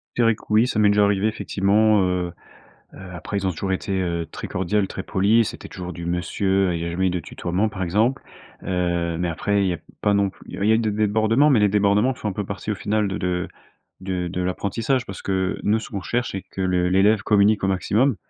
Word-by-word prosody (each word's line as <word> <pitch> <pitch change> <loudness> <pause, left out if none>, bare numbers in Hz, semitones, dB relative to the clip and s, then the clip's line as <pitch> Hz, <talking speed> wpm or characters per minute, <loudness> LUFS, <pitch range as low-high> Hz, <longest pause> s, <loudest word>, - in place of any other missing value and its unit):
Je 120 - +2
dirais 115 -1 +4
que - - -19
oui. 110 +3 +4
Ça 115 - -1
m'est 105 -1 +5
déjà 105 0 +4
arrivé 100 +1 +2
effectivement, 105 0 +2
heu. 90 -1 0 0.6
Heu, - - -12 0.2
après, 90 +3 -5
ils 95 - -2
ont - - +2
toujours 95 +3 -3
été, 95 +1 -3
heu, 85 -2 -2
très - - -7
cordiales, 95 +2 0
très 95 - -5
polis. 105 +4 +2
C'était - - -10
toujours 90 -1 -7
du 85 -1 -7
monsieur, 90 +2 0
il 85 - -3
y - - -3
a 85 - -3
jamais 90 +2 0
de 90 - -2
tutoiement, 90 +5 -2
par 100 -2 -6
exemple. 110 +9 +1 0.4
Heu, 85 -2 -1
mais 90 0 -1
après, 100 +5 0
il 95 - +1
y 90 - 0
a - - -7 0.2
pas 105 - +2
non 100 -1 +2
plus - - -25
il - - -9
y 110 - +4
a - - +5
eu - - +3
des 110 -2 0
débordements, 110 +6 +2
mais 120 -6 +4
les 105 - +4
débordements 105 +5 +2
font 110 - -4
un - - -2
peu 105 +2 -3
partie 100 +2 -5
au 105 - 0
final 105 +2 0
de 95 - -3
de 90 -1 -2 0.5
de 90 -2 -3
de 90 +1 -4
l'apprentissage 110 +8 -1
parce 100 - -8
que 95 -1 -1
nous, 105 +2 +2
ce 110 - -8
qu'on 100 - -4
cherche, 120 +5 -2
c'est 95 - -4
que 95 - -9
l'élève 95 +3 +3
communique 105 -1 +3
au - - +2
maximum. 105 +7 +1
100 Hz, 245 wpm, -23 LUFS, 90-105 Hz, 0.6 s, m'est